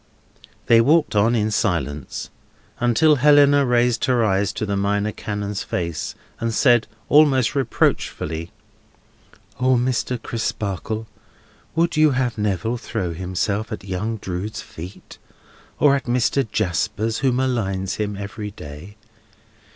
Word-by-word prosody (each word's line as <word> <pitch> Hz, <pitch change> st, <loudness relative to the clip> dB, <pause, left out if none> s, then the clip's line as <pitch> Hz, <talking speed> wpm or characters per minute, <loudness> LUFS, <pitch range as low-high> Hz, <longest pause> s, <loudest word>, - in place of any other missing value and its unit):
They 115 Hz, -1 st, +6 dB
walked 150 Hz, 0 st, +3 dB
on 110 Hz, +4 st, +3 dB
in 110 Hz, -1 st, +1 dB
silence, 85 Hz, -, -2 dB, 0.5 s
until 145 Hz, +6 st, +4 dB
Helena 145 Hz, 0 st, +5 dB
raised 120 Hz, -1 st, +2 dB
her 125 Hz, -3 st, +2 dB
eyes 100 Hz, -1 st, +1 dB
to 110 Hz, -, -3 dB
the 100 Hz, -1 st, -1 dB
Minor 100 Hz, +1 st, 0 dB
Canon's 105 Hz, -1 st, -4 dB
face, 85 Hz, -3 st, -3 dB, 0.2 s
and 115 Hz, 0 st, -1 dB
said, 120 Hz, -1 st, +3 dB, 0.2 s
almost 140 Hz, -5 st, +4 dB
reproachfully: 85 Hz, -, -1 dB, 1.1 s
"O 130 Hz, 0 st, +3 dB
Mr. 125 Hz, 0 st, 0 dB
Crisparkle, 110 Hz, -1 st, -3 dB, 0.7 s
would 170 Hz, 0 st, +1 dB
you 155 Hz, 0 st, +6 dB
have 125 Hz, -2 st, 0 dB
Neville 105 Hz, +2 st, -1 dB
throw 105 Hz, -7 st, -3 dB
himself 95 Hz, +5 st, -2 dB
at 105 Hz, -, -5 dB
young 100 Hz, +4 st, -3 dB
Drood's 95 Hz, +2 st, -5 dB
feet, 90 Hz, +5 st, -11 dB, 0.6 s
or 140 Hz, -2 st, +5 dB
at 135 Hz, -, -3 dB
Mr. 125 Hz, +1 st, +1 dB
Jasper's, 110 Hz, +5 st, -1 dB
who 135 Hz, -, +2 dB
maligns 115 Hz, -7 st, -1 dB
him 105 Hz, -1 st, -2 dB
every 105 Hz, +1 st, -6 dB
day? 90 Hz, +2 st, -11 dB
110 Hz, 125 wpm, -22 LUFS, 100-125 Hz, 1.1 s, They